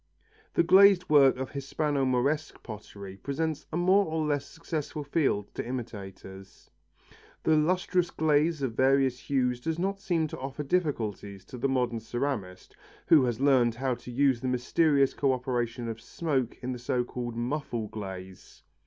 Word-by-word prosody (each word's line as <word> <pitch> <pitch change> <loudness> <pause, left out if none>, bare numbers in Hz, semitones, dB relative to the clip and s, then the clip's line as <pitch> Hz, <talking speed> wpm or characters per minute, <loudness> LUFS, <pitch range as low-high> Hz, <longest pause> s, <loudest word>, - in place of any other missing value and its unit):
The - - +4
glazed 190 0 +6
work 140 -3 +6
of 130 0 -4
Hispano 140 0 -1
Moresque 135 +5 0
pottery 100 -3 -9
presents 155 +5 -3
a 160 - -2
more 185 +3 +4
or 160 -1 -1
less 145 -2 -1
successful 155 -2 -5
field 140 -9 0
to - - -4
imitators. 95 -6 -8 0.7
The 160 - +4
lustrous 180 +3 +1
glaze 155 0 +1
of 125 -4 -1
various 130 0 +2
hues 125 -3 0
does 160 +4 -2
not 195 +3 -1
seem 175 -5 0
to - - -7
offer 135 +3 -5
difficulties 110 - -2
to 125 - -9
the 135 - +1
modern 125 -3 0
ceramist, 115 -6 -4 0.3
who 150 -5 +6
has 120 -2 -2
learned 130 -4 +3
how 130 +1 -1
to 125 - -9
use 130 -1 +2
the 130 - -2
mysterious 135 +3 +2
co 135 -2 +1
operation 120 -2 -2
of 115 0 -5
smoke 135 -8 -2
in 130 - -2
the 125 - -5
so 125 +1 0
called 120 -1 -5
muffle 120 -2 -3
glaze. 95 -3 -9
130 Hz, 160 wpm, -28 LUFS, 120-155 Hz, 0.7 s, glazed